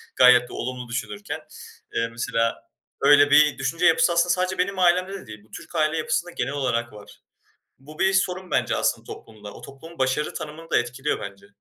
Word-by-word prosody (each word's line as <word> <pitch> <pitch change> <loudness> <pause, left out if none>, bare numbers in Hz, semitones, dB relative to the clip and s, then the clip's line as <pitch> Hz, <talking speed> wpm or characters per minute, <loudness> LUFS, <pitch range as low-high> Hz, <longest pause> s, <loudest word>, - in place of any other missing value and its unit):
gayet 125 -1 +6
de - - -11
olumlu 125 -1 -5
düşünürken. 105 -4 -5 0.5
Eee, 115 - 0
mesela, 115 0 -2 0.4
öyle 145 0 +6
bir 150 0 +5
düşünce 140 +6 -1
yapısı 170 +1 +4
aslında 170 +1 +2
sadece 185 +1 0
benim 190 +1 -1
ailemde 185 - +1
değil, 105 -1 -11
bu 105 - -27
Türk - - -11
aile 155 0 +1
yapısında 170 +2 -1
genel 135 -5 -3
olarak 120 -5 -2
var. 105 -1 -14 0.6
Bu 150 +4 -14
bir 190 0 +3
sorun 185 -1 -1
bence - - +1
aslında - - 0
toplumda. 105 -2 -11
O, - - -12
toplum 160 +5 -12
başarı 130 +3 0
tanımını 160 +2 -8
da - - +4
etkiliyor 125 +4 -2
bence. 100 0 -9
140 Hz, 180 wpm, -24 LUFS, 120-170 Hz, 0.6 s, gayet